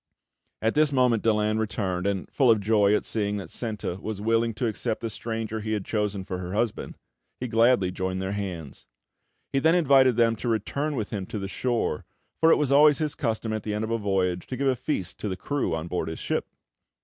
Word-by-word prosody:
At 110 Hz, -, +2 dB
this 150 Hz, -1 st, +3 dB
moment 125 Hz, -4 st, +3 dB
Daland 110 Hz, -1 st, +1 dB
returned, 100 Hz, -4 st, -1 dB
and, 100 Hz, -2 st, -1 dB
full 130 Hz, -4 st, +3 dB
of 110 Hz, -2 st, +5 dB
joy 105 Hz, 0 st, +3 dB
at -, -, -1 dB
seeing 105 Hz, -2 st, -1 dB
that 100 Hz, -, -7 dB
Senta 105 Hz, -6 st, -3 dB
was 110 Hz, -2 st, -4 dB
willing 115 Hz, +2 st, +1 dB
to 120 Hz, -, -2 dB
accept 110 Hz, 0 st, -2 dB
the 115 Hz, -, -3 dB
stranger 110 Hz, 0 st, -4 dB
he 110 Hz, +1 st, -3 dB
had 105 Hz, -3 st, -2 dB
chosen 105 Hz, -3 st, -1 dB
for 95 Hz, -1 st, -5 dB
her 90 Hz, 0 st, -5 dB
husband, 110 Hz, +1 st, -2 dB, 0.4 s
he 125 Hz, -, -3 dB
gladly 115 Hz, -4 st, +3 dB
joined 95 Hz, 0 st, -3 dB
their 95 Hz, 0 st, -2 dB
hands. 90 Hz, -8 st, -6 dB, 0.7 s
He 135 Hz, -, +3 dB
then 160 Hz, +4 st, +4 dB
invited 135 Hz, -7 st, +5 dB
them 115 Hz, -1 st, +3 dB
to 120 Hz, -, -3 dB
return 140 Hz, +7 st, -1 dB
with 110 Hz, -5 st, -3 dB
him 95 Hz, -3 st, -4 dB
to -, -, -5 dB
the 100 Hz, -1 st, -4 dB
shore; 120 Hz, -6 st, -1 dB, 0.4 s
for 165 Hz, 0 st, +5 dB
it -, -, +7 dB
was 145 Hz, -3 st, 0 dB
always 145 Hz, +1 st, +6 dB
his 155 Hz, -2 st, -1 dB
custom, 110 Hz, -3 st, -2 dB
at 110 Hz, -, -2 dB
the 105 Hz, 0 st, -3 dB
end 105 Hz, -, -2 dB
of 110 Hz, -, -3 dB
a 115 Hz, -, 0 dB
voyage, 95 Hz, -3 st, 0 dB
to 130 Hz, -, -4 dB
give 140 Hz, -, 0 dB
a 130 Hz, -, +3 dB
feast 110 Hz, -, -3 dB
to 105 Hz, -, -3 dB
the 95 Hz, -, -3 dB
crew 140 Hz, -, -1 dB
on 80 Hz, +1 st, -4 dB
board 90 Hz, -1 st, -2 dB
his 80 Hz, -, -5 dB
ship. -, -, -2 dB
110 Hz, 225 wpm, -26 LUFS, 100-120 Hz, 0.7 s, it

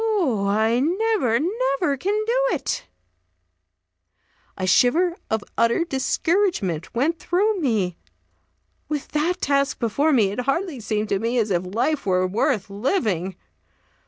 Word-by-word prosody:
Oh, 320 Hz, -, +1 dB
I 220 Hz, +4 st, +2 dB
never, 350 Hz, -, +1 dB
never 325 Hz, -, 0 dB
can 410 Hz, +9 st, -1 dB
do 485 Hz, +2 st, +1 dB
it!" 280 Hz, -, -3 dB, 1.7 s
A 185 Hz, -, -2 dB
shiver 320 Hz, -, +3 dB
of 220 Hz, -1 st, -1 dB, 0.2 s
utter 230 Hz, +8 st, +3 dB
discouragement 270 Hz, -, 0 dB
went 305 Hz, +7 st, +1 dB
through 400 Hz, +5 st, +1 dB
me. 210 Hz, -, 0 dB, 0.9 s
With 300 Hz, -2 st, -3 dB
that 325 Hz, +4 st, -1 dB
task 280 Hz, 0 st, +1 dB
before 275 Hz, +7 st, +1 dB
me, 220 Hz, -8 st, +3 dB
it 205 Hz, -, -5 dB
hardly 275 Hz, +4 st, -1 dB
seemed 215 Hz, -1 st, -2 dB
to 195 Hz, -, +1 dB
me 230 Hz, +3 st, -1 dB
as 220 Hz, -3 st, +1 dB
if 180 Hz, +2 st, -2 dB
life 275 Hz, +1 st, 0 dB
were 185 Hz, -1 st, +2 dB
worth 195 Hz, +1 st, 0 dB
living. 200 Hz, -, -1 dB
260 Hz, 130 wpm, -23 LUFS, 210-340 Hz, 1.7 s, shiver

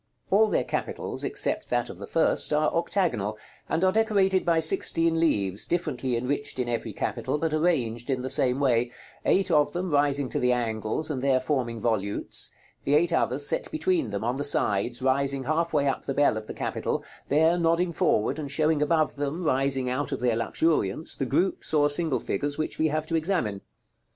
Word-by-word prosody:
§ -, -, -50 dB
LXVI. 120 Hz, -, -5 dB
All 220 Hz, -, +5 dB
their -, -, +1 dB
capitals, -, -, -4 dB
except 420 Hz, +1 st, 0 dB
that -, -, 0 dB
of -, -, -10 dB
the -, -, -7 dB
first, -, -, +2 dB
are 150 Hz, 0 st, +2 dB
octagonal, 165 Hz, -, -1 dB, 0.3 s
and 165 Hz, -, 0 dB
are 185 Hz, -, +4 dB
decorated 200 Hz, -3 st, +2 dB
by 170 Hz, -1 st, +2 dB
sixteen 165 Hz, +1 st, +2 dB
leaves, 100 Hz, -, +1 dB
differently 135 Hz, -8 st, -1 dB
enriched 140 Hz, +4 st, -3 dB
in 125 Hz, -1 st, -1 dB
every 120 Hz, -1 st, -2 dB
capital, -, -, -2 dB
but 160 Hz, 0 st, -1 dB
arranged 130 Hz, -8 st, 0 dB
in 130 Hz, -2 st, -1 dB
the 130 Hz, -, -3 dB
same 130 Hz, -2 st, +2 dB
way; 125 Hz, -3 st, +2 dB, 0.4 s
eight 190 Hz, -1 st, +2 dB
of 150 Hz, -2 st, +3 dB
them 180 Hz, 0 st, -3 dB
rising 145 Hz, -1 st, +2 dB
to -, -, -1 dB
the 125 Hz, -, +2 dB
angles, 115 Hz, +5 st, -2 dB
and 130 Hz, -4 st, -3 dB
there 135 Hz, -1 st, +3 dB
forming 130 Hz, -4 st, -2 dB
volutes; 105 Hz, -3 st, -1 dB, 0.3 s
the 145 Hz, -, +2 dB
eight 170 Hz, +3 st, +3 dB
others 145 Hz, -3 st, +1 dB
set -, -, -1 dB
between 335 Hz, +1 st, 0 dB
them, -, -, -4 dB
on 120 Hz, +3 st, -1 dB
the 145 Hz, -, -2 dB
sides, 120 Hz, -1 st, +1 dB
rising 135 Hz, +1 st, +1 dB
half 165 Hz, +5 st, 0 dB
way 145 Hz, -2 st, +1 dB
up 135 Hz, -, -2 dB
the 135 Hz, -, -3 dB
bell 145 Hz, -5 st, +3 dB
of 110 Hz, 0 st, -6 dB
the -, -, -6 dB
capital; -, -, -2 dB, 0.2 s
there 160 Hz, +4 st, +3 dB
nodding 170 Hz, +1 st, +1 dB
forward, 110 Hz, -1 st, +1 dB
and 145 Hz, -2 st, -5 dB
showing 155 Hz, -1 st, +1 dB
above 155 Hz, 0 st, +1 dB
them, 145 Hz, +5 st, -3 dB
rising 135 Hz, -3 st, +1 dB
out 130 Hz, +3 st, -2 dB
of 135 Hz, -, -2 dB
their 120 Hz, -2 st, +1 dB
luxuriance, 115 Hz, +1 st, 0 dB
the 135 Hz, -, -3 dB
groups 160 Hz, +3 st, 0 dB
or 145 Hz, -1 st, +3 dB
single 160 Hz, -1 st, 0 dB
figures 145 Hz, 0 st, -2 dB
which 155 Hz, -, -3 dB
we 160 Hz, -, +3 dB
have 155 Hz, 0 st, -1 dB
to 165 Hz, -, -6 dB
examine. 155 Hz, -, -1 dB
145 Hz, 200 wpm, -26 LUFS, 125-165 Hz, 0.4 s, All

